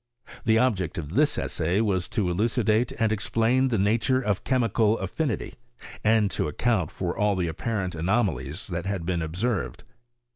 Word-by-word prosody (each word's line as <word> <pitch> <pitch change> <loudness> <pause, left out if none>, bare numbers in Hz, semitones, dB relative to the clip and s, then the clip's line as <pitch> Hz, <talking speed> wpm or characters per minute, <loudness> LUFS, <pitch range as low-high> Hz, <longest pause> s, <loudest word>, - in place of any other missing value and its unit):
The 110 -1 +4
object 105 -9 +1
of 80 -1 -5
this 150 +4 +2
essay 85 +4 -1
was 95 -5 0
to 105 -6 -1
elucidate 110 +3 +1
and 110 -1 0
explain 115 +4 +1
the 120 -3 0
nature 110 +6 +2
of 105 -6 -1
chemical 115 -4 +2
affinity, 115 - -3 0.5
and 110 -2 +3
to - - -1
account 90 +2 0
for 90 -2 -3
all 105 -2 +2
the 90 -2 -1
apparent 95 +2 -2
anomalies 85 - -1
that 85 +1 -3
had 95 -4 -2
been 85 -1 -1
observed. 95 +8 -2
105 Hz, 155 wpm, -26 LUFS, 90-115 Hz, 0.5 s, The